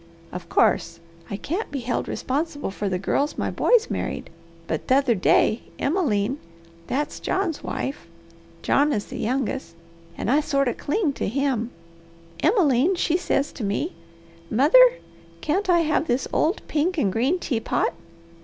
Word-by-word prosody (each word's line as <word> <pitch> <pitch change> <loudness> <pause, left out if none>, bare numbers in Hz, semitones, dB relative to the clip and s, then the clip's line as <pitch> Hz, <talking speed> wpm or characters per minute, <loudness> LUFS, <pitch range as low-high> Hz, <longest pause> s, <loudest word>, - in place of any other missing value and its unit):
Of 175 -1 -8
course, - - +2 0.3
I 200 - -3
can't 355 - -3
be 275 -2 -4
held 240 +1 -2
responsible 290 - -2
for 200 +1 -3
the 185 - 0
girls 280 +10 -1
my - - -1
boys 475 -2 +3
married, - - -4 0.3
but 160 - -3
t'other 265 -1 +4
day 215 +2 +3 0.2
Emmeline 275 - 0 0.5
that's 290 +3 -2
John's 375 -5 -1
wife 270 - -4 0.6
John 290 +1 +3
is 205 - -2
the - - -8
youngest, 255 -5 -2 0.4
and 230 - -1
I 285 - +5
sort 280 -3 +1
o' 245 - +1
cling 310 -1 -1
to - - -3
him 255 -1 0 0.7
Emmeline 330 - +3
she 340 -1 +1
says 320 -5 0
to 240 - -6
me, 210 - -1 0.6
'Mother, 295 - +7 0.5
can't 380 +6 -1
I 345 -1 +5
have 310 0 +1
this 245 +2 0
old 335 +7 +1
pink 330 +4 0
and 200 -10 +1
green 265 +10 +2
teapot?' 245 -10 -1
280 Hz, 150 wpm, -24 LUFS, 235-325 Hz, 0.7 s, Mother